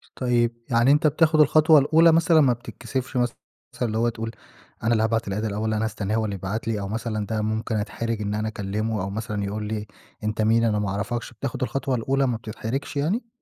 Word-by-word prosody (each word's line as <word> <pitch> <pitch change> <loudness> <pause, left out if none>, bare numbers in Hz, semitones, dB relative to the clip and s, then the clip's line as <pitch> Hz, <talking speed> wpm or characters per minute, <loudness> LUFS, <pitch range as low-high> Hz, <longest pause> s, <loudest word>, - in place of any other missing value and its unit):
طيب 120 -2 +1 0.2
يعني 120 +2 +4
أنت 150 +1 +4
بتاخد 155 +1 +3
الخطوة 155 +1 +6
الأولى 160 +4 +5
مثلًاً، 165 0 +5
ما 130 -4 +4
بتتكسفش 125 +2 -5
مثلًا 120 -1 +1 0.5
اللي 110 -2 0
هو 120 +1 +2
تقول 115 -1 -5 0.5
أنا 115 - +2
اللي 110 -1 +3
هابعت 115 -1 0
الadd - - -2
الأول، 110 +1 -1
أنا 110 +1 0
هاستناه 105 -1 -2
هو 110 - +1
اللي 100 -2 -3
يبعت 100 +4 -4
لي، 110 -2 0
أو 100 - -4
مثلًا 110 0 -3
ده 110 +1 -2
ممكن 110 +1 -2
أتحرج 110 +1 -2
إن 105 0 -2
أنا 110 +1 -1
أكلمه، 105 0 -2
أو 95 - -3
مثلًاً 105 0 -3
يقول 105 +2 -3
لي 105 -1 -4 0.4
أنت 110 +1 -1
مين، 115 +2 +3
أنا 105 -2 +2
ما 105 - -1
أعرفكش، 115 +5 -3
بتاخد 130 +3 -4
الخطوة 135 0 -1
الأولى، 135 +4 +1
ما 120 -3 0
بتتحرجش 115 +5 -5
يعني؟ 190 - 0
115 Hz, 210 wpm, -24 LUFS, 110-130 Hz, 0.5 s, الخطوة